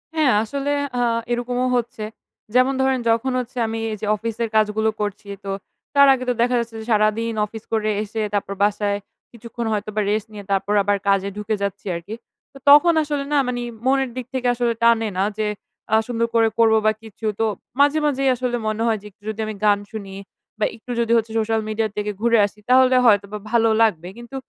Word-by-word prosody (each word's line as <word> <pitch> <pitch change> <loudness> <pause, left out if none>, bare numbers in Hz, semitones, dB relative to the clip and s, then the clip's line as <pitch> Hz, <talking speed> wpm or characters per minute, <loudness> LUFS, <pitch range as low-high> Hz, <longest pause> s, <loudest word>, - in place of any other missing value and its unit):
হ্যাঁ, 305 -5 +3
আসলে 280 +5 -3 0.3
আ - - +2 0.3
এরকমও 245 +1 -1
হচ্ছে। 235 -2 -2 0.5
যেমন 255 +2 +4
ধরেন 265 -1 +2
যখন 230 +3 +1
হচ্ছে 250 +1 -7
আমি 225 0 -3
এই - - -2
যে, - - -2
অফিসের 230 +2 -3
কাজগুলো 215 0 +2
করছি, 205 0 -4 0.2
তো 195 - -3 0.4
তার 280 0 +7
আগে 255 -1 -3
তো - - +3
দেখা 245 +1 +2
যাচ্ছে 230 -1 -5
যে, - - -9
সারাদিন 215 +2 +2
অফিস 220 +1 -10
করে 215 -1 +1
এসে 220 +1 -4
তারপর 200 -1 -1
বাসায় 205 0 +1 0.3
কিছুক্ষণ 235 0 -7
হয়তোবা 215 0 -2
rest 215 +1 -1
নিয়ে 205 -1 -8
তারপর 195 +1 +1
আবার 205 0 +1
কাজে 195 0 +2
ঢুকে 210 +1 -1
যাচ্ছি 200 0 -4
আরকি। 175 +6 -6 0.4
তো - - -12
তখন 295 +4 +8
আসলে 290 -1 -2
না 290 - +4
মানে, 245 -1 -2 0.2
মনের 270 0 +2
দিক 255 - -4
থেকে 255 -1 -1
আসলে 240 -1 +1
টানে 230 -1 +4
না 190 - +2
যে, 215 -1 0 0.5
আ - - +7
সুন্দর 230 -1 0
করে 225 -1 +5
করব 225 -1 +5
বা 215 - +5
কিছু। 220 0 -10
তো 225 - +2 0.3
মাঝে 290 +2 +4
মাঝেই 275 -2 +1
আসলে 245 0 -2
মনে 215 +1 -2
হয় 225 -1 +2
যে, - - -17
একটু 200 - -50
যদি 220 0 -5
আমি 215 0 -5
গান 205 -1 +4
শুনি 200 -3 -7 0.4
বা 215 - +2
একটু 245 +2 -10
যদি 230 -1 0
হচ্ছে 225 0 -1
social 225 0 0
media 215 +1 -1
এর - - -16
থেকে 210 0 -1
ঘুরে 235 0 +4
আসি, 205 +1 -9
তাহলে 255 0 +5
হয়তোবা 205 -2 +3
ভালো 230 -1 +4
লাগবে। 175 -7 +2
কিন্তু 240 +3 -10
225 Hz, 205 wpm, -21 LUFS, 210-245 Hz, 0.5 s, তখন